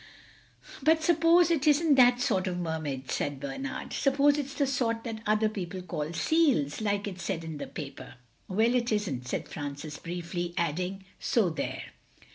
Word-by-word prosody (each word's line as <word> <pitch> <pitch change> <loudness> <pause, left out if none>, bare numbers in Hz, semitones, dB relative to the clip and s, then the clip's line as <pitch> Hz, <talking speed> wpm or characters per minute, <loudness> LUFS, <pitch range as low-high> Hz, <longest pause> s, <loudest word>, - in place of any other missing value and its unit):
"But 320 +3 +3
suppose 335 +1 +5
it 305 -3 +1
isn't 300 +1 +5
that 250 -2 +6
sort 190 -6 +1
of 180 -1 -2
Mermaid," 155 -6 -3
said 145 -1 -2
Bernard. 140 - -5
"Suppose 285 +1 +3
it's 280 -1 -5
the 285 - +2
sort 235 -4 0
that 225 -2 -5
other 215 +1 +3
people 190 -3 -5
call 155 -3 -4
seals, 225 - +2
like 205 -1 0
it 190 -2 -6
said 170 -1 -3
in 160 -2 -6
the - - -5
paper." 135 -4 -8 0.3
"Well, 220 +5 +2
it 240 -1 +1
isn't," 175 - -1
said - - -3
Francis 145 +1 -6
briefly, 175 0 -4
adding, 180 +4 -2
"so 210 -8 +2
there!" 160 - -4
195 Hz, 165 wpm, -29 LUFS, 165-265 Hz, 0.3 s, that